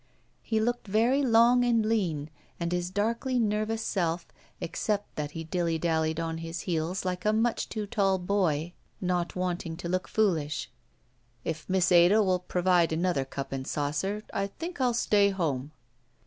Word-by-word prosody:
He 220 -1 0
looked 240 +1 -1
very 230 +7 +3
long 240 -1 +5
and 230 -3 +2
lean 170 -10 0 0.3
and 170 0 -2
his 180 0 -1
darkly 230 +6 0
nervous 215 0 0
self, 170 -3 -1 0.3
except 205 +4 -2
that 150 -1 -3
he 165 - -4
dilly 165 0 -1
dallied 160 -1 0
on 165 0 -3
his 165 +1 -5
heels 175 +2 -2
like 180 -1 -2
a 215 - +3
much 225 +2 0
too 215 -2 -3
tall 195 -2 +1
boy 180 -4 0 0.3
not 180 -2 -1
wanting 175 -2 -2
to 170 - -5
look 185 +1 -1
foolish. 155 - 0 0.7
"If 155 -1 -4
Miss 185 -1 +2
Ada 180 +5 +6
will 185 -2 +2
provide 180 -1 +2
another 165 -4 0
cup 135 +1 -6
and 135 -1 -4
saucer, 155 +9 -2
I 200 0 0
think 330 - -6
I'll 245 -2 +2
stay 205 -3 +3
home." 155 -8 -2
180 Hz, 160 wpm, -28 LUFS, 165-215 Hz, 0.7 s, Ada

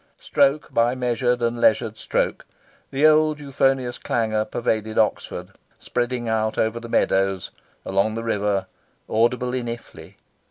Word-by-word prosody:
Stroke 140 +1 +1
by 120 +2 +3
measured 125 -1 0
and 115 0 0
leisured 110 -1 +3
stroke, - - -1 0.5
the 140 +3 +1
old 155 -1 +4
euphonious 135 -3 0
clangour 110 -2 0
pervaded 110 -1 -2
Oxford, 110 -1 0 0.3
spreading 120 -1 -2
out 110 -1 0
over 110 +1 0
the 115 0 -9
meadows, 95 -3 +1 0.3
along 100 +3 +1
the 115 - -4
river, 105 -3 0 0.4
audible 125 +3 +1
in 125 -2 -2
Iffley. 115 0 -8
115 Hz, 130 wpm, -23 LUFS, 110-125 Hz, 0.5 s, old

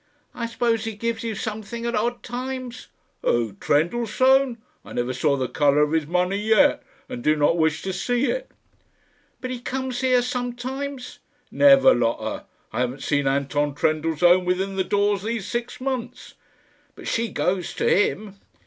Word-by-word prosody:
"I 235 - -3
suppose 230 -1 0
he 225 -1 -4
gives 230 +1 -2
you 225 -2 -3
something 220 +2 -5
at 235 - -1
odd 240 +2 -1
times?" 250 0 -6 0.3
"Who? 115 -3 +1
Trendellsohn? 240 - +2 0.3
I - - -11
never 120 +1 -1
saw 140 0 +1
the 130 -1 -1
colour 145 0 +2
of 150 - 0
his 160 -2 0
money 180 +3 0
yet, 220 +7 +3 0.3
and 250 -2 -7
do 155 - +3
not 150 +2 +3
wish 160 -2 +1
to 190 - -3
see 245 +7 0
it." - - -2 0.9
"But 255 - -4
he 250 - -4
comes 260 0 -3
here 255 -1 +3
sometimes?" 250 +2 -4 0.3
"Never, 275 -1 +6
Lotta. 115 -2 -1 0.3
I - - -2
haven't 125 +2 -2
seen 145 -2 +1
Anton 140 +1 0
Trendellsohn 165 +4 +3
within 190 +2 -1
the 190 - +1
doors 205 0 +1
these 220 -1 -3
six 235 +3 -4
months." 260 -2 -4 0.6
"But - - -10
she 230 0 0
goes 180 -3 -2
to - - 0
him?" 205 0 +1
215 Hz, 160 wpm, -23 LUFS, 160-245 Hz, 0.9 s, Never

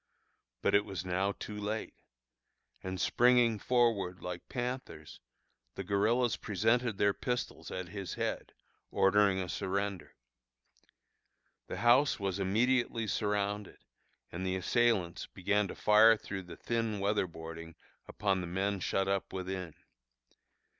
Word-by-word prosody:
But - - +2
it 100 - +5
was 95 -3 -6
now 95 +2 0
too 105 - -7
late; 105 +2 -3 0.9
and 95 0 -5
springing 120 -3 +4
forward 115 -7 +1
like 90 -1 -7
panthers, 125 - -5 0.6
the - - -4
guerillas 110 +4 +1
presented 115 +2 +1
their 100 0 +3
pistols 125 +3 -4
at 95 -1 -5
his 100 -2 -5
head, - - -3 0.4
ordering 100 0 +3
a 95 -1 -2
surrender. 100 +1 -3 1.5
The - - -5
house 130 +4 +5
was 100 -1 -2
immediately 115 +4 +1
surrounded 105 0 -2 0.5
and 90 +2 -5
the 95 0 -1
assailants 95 -2 +1
began 105 +2 0
to - - -7
fire 110 +1 +6
through 95 -3 -6
the 90 - -10
thin 115 -3 -2
weather 100 -1 +1
boarding 80 0 -9 0.3
upon 95 -2 0
the 90 - -5
men 95 +3 -1
shut 95 +2 0
up 100 0 -1
within. 95 -3 -5
100 Hz, 125 wpm, -32 LUFS, 95-110 Hz, 1.5 s, fire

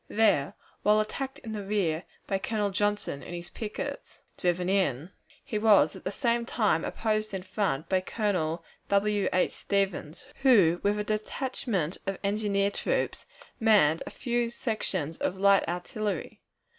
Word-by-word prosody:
There, 210 -10 +2 0.3
while 210 +1 +4
attacked 265 +5 -3
in 225 - -8
the 210 -2 -4
rear 190 -5 0 0.2
by 195 -1 -1
Colonel 210 0 -1
Johnson 205 -7 -1
and 175 - -7
his 175 0 -8
pickets 215 -2 -5 0.2
driven 180 0 0
in, 185 -5 +1 0.3
he 215 - -2
was 205 -8 +5
at - - -12
the 190 - -1
same 235 +1 +1
time 210 -8 +1
opposed 215 -2 -1
in 185 - -4
front 185 -6 -1
by 185 -1 +2
Colonel 180 -5 -1 0.2
W. 205 0 +2
H. 185 - +2
Stevens, 190 -5 -2 0.2
who, 195 -11 +5
with 205 +1 +1
a 210 - -1
detachment 215 - -2
of 195 -1 -1
engineer 200 -1 +1
troops, - - -1 0.3
manned 200 -9 +4
a - - -3
few 240 -2 -1
sections 195 - -2
of 185 - -2
light 200 -1 +4
artillery. 200 +4 -3
200 Hz, 150 wpm, -28 LUFS, 180-215 Hz, 0.3 s, was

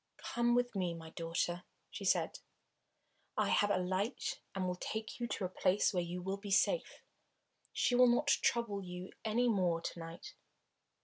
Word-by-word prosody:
"Come 240 0 +1
with 245 -2 +1
me, 180 -3 0
my 160 -1 -9
daughter," 170 +2 -2 0.3
she - - -6
said. - - +2 1.0
"I - - +2
have 205 - +3
a 205 - +3
light 190 +6 -1 0.2
and 190 -1 -1
will 180 - 0
take 220 +5 -4
you 240 - -1
to 200 - -2
a - - +1
place 185 +2 +2
where 180 - +2
you 175 +1 -4
will 190 +1 -2
be 200 0 -8
safe. - - +2 0.7
She - - +1
will 250 0 +7
not 240 +5 +3
trouble 235 -7 +2
you 180 +1 -7
any 235 +3 +2
more 180 -7 +2
to 170 - -5
night. 165 0 -8
195 Hz, 175 wpm, -35 LUFS, 180-235 Hz, 1.0 s, will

